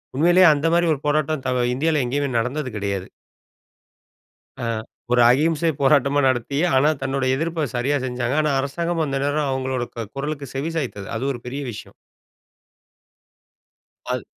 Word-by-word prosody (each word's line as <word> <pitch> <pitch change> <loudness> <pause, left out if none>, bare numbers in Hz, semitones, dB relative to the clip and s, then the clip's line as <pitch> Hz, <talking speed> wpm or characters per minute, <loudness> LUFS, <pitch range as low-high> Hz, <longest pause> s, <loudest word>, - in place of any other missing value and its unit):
உண்மையிலயே 175 +5 +6
அந்த 150 +2 0
மாதிரி 170 0 +3
ஒரு 140 - -5
போராட்டம், 150 -1 0
த - - +1 0.3
இந்தியால 155 +2 +1
எங்கயுமே 140 +3 -1
நடந்தது 130 +4 -2
கிடையாது. 100 -2 -3 1.5
ஆ, - - -4 0.5
ஒரு 125 0 +5
அகிம்சை 160 +4 +2
போராட்டமா 140 0 +3
நடத்தி, 130 +2 -1 0.2
ஆனா 140 +3 +4
தன்னுடைய 130 0 0
எதிர்ப்ப 165 -1 -1
சரியா 135 +4 +1
செஞ்சாங்க. 125 +1 -2
ஆனா 150 -1 +1
அரசாங்கம் 165 +4 -1
அந்த 140 -2 -2
நேரம் 145 0 0
அவங்களோட 130 -1 -2
க 115 -2 -5
குரலுக்கு 145 0 -4
செவி 150 +5 -2
சாய்த்தது. 110 -10 -4
அது 125 - -3
ஒரு 120 - -7
பெரிய 135 +3 -4
விஷயம்! 105 - -10 2.2
அது - - -3
140 Hz, 140 wpm, -22 LUFS, 130-155 Hz, 2.2 s, உண்மையிலயே